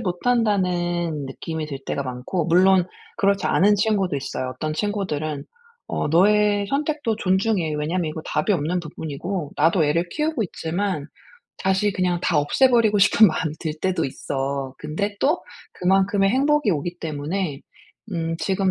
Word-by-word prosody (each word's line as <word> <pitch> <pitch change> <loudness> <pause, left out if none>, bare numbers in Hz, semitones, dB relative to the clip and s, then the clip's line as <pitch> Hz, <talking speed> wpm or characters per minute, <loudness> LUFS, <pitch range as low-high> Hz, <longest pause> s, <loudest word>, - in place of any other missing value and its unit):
못한다는 180 - 0
느낌이 155 +4 -5
들 140 -3 -6
때가 140 - -2
많고 130 +7 -3
물론 185 +2 +5 0.3
그렇지 200 -2 +2
않은 205 +2 +4
친구도 200 -6 +1
있어요. 130 -1 -4
어떤 155 +4 -3
친구들은 155 -8 -2 0.4
"어 - - -2
너의 205 +4 +3
선택도 290 -5 -1
존중해. 190 -5 +1
왜냐하면 160 +3 -1
이거 155 +1 -4
답이 150 +7 0
없는 175 +1 0
부분이고 160 +1 -5
나도 160 +2 +3
애를 165 +4 +1
키우고 305 -5 -1
있지만 175 -2 -3 0.5
다시 190 +1 +1
그냥 180 -2 0
다 - - +2
없애버리고 225 - +3
싶은 210 +2 +6
마음이 155 -1 -2
들 160 -2 -2
때도 185 -4 0
있어. 135 0 -3
근데 200 +7 -3
또 305 +6 +2 0.3
그만큼의 195 +2 +2
행복이 285 0 +2
오기 175 +2 -2
때문에 155 0 -3 0.5
음 165 -1 -2
지금 190 0 0
180 Hz, 325 characters per minute, -23 LUFS, 155-205 Hz, 0.5 s, 싶은